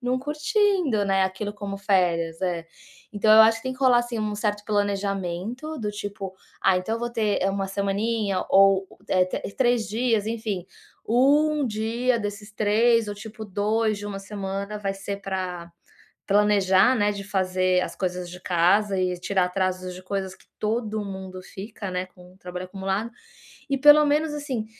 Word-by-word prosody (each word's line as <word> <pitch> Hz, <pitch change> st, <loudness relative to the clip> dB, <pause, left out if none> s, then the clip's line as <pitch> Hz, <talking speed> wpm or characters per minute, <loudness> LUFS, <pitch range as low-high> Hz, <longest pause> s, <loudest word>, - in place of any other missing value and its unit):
não 250 Hz, +1 st, 0 dB
curtindo, 310 Hz, -, +1 dB
né, 195 Hz, -1 st, +2 dB
aquilo 190 Hz, +2 st, -2 dB
como 200 Hz, -1 st, -6 dB
férias, 175 Hz, -4 st, +1 dB
é. 175 Hz, -3 st, -2 dB, 0.5 s
Então 210 Hz, +1 st, +2 dB
eu 220 Hz, -, +9 dB
acho 225 Hz, +1 st, +4 dB
que -, -, -15 dB
tem 260 Hz, -, -2 dB
que 255 Hz, -, -12 dB
rolar 255 Hz, -3 st, +5 dB
assim 240 Hz, -1 st, -3 dB
um 215 Hz, -1 st, -2 dB
certo 205 Hz, -1 st, -2 dB
planejamento 205 Hz, -, -2 dB
do 210 Hz, -2 st, -2 dB
tipo: 200 Hz, -2 st, -6 dB, 0.3 s
"Ah, 185 Hz, -1 st, +4 dB
então 220 Hz, +5 st, -3 dB
eu -, -, -3 dB
vou 240 Hz, 0 st, -2 dB
ter, 220 Hz, -3 st, 0 dB
é, 195 Hz, -, +2 dB
1 195 Hz, 0 st, -2 dB
semaninha 200 Hz, 0 st, -1 dB
ou 195 Hz, 0 st, +5 dB
o -, -, -18 dB
é 185 Hz, -1 st, +4 dB
tr -, -, -3 dB, 0.2 s
3 245 Hz, -3 st, +2 dB
dias", 225 Hz, -1 st, 0 dB
enfim. 220 Hz, -5 st, -3 dB, 0.4 s
1 290 Hz, +5 st, +3 dB
dia 230 Hz, +3 st, 0 dB
desses 205 Hz, 0 st, -5 dB
3 220 Hz, +2 st, +3 dB
ou 205 Hz, -, -4 dB
tipo 220 Hz, +1 st, -9 dB
2 215 Hz, +2 st, 0 dB
de 205 Hz, -, -6 dB
1 200 Hz, -1 st, -5 dB
semana 200 Hz, +1 st, -5 dB
vai 195 Hz, -1 st, -2 dB
ser 200 Hz, +1 st, -5 dB
pra 185 Hz, -3 st, -4 dB, 0.6 s
planejar, 200 Hz, +2 st, +4 dB
né, 205 Hz, -4 st, +2 dB
de 200 Hz, -1 st, -5 dB
fazer 185 Hz, -2 st, +1 dB
as -, -, -4 dB
coisas 180 Hz, -1 st, -3 dB
de 180 Hz, +1 st, -9 dB
casa 185 Hz, +3 st, +2 dB
e 180 Hz, -1 st, 0 dB
tirar 185 Hz, +1 st, +1 dB
atrasos 185 Hz, 0 st, -2 dB
de 185 Hz, -, -10 dB
coisas 190 Hz, 0 st, -4 dB
que -, -, -23 dB
todo 215 Hz, -1 st, -1 dB
mundo 190 Hz, -2 st, -7 dB
fica, 200 Hz, +1 st, -8 dB
né, 180 Hz, 0 st, -2 dB
com 180 Hz, 0 st, -18 dB
trabalho 180 Hz, -1 st, -7 dB
acumulado. 195 Hz, +4 st, -3 dB, 0.6 s
E 275 Hz, -, +1 dB
pelo 295 Hz, +2 st, +8 dB
menos 295 Hz, +1 st, +1 dB
assim, 265 Hz, -7 st, -3 dB
205 Hz, 175 wpm, -25 LUFS, 190-225 Hz, 0.6 s, eu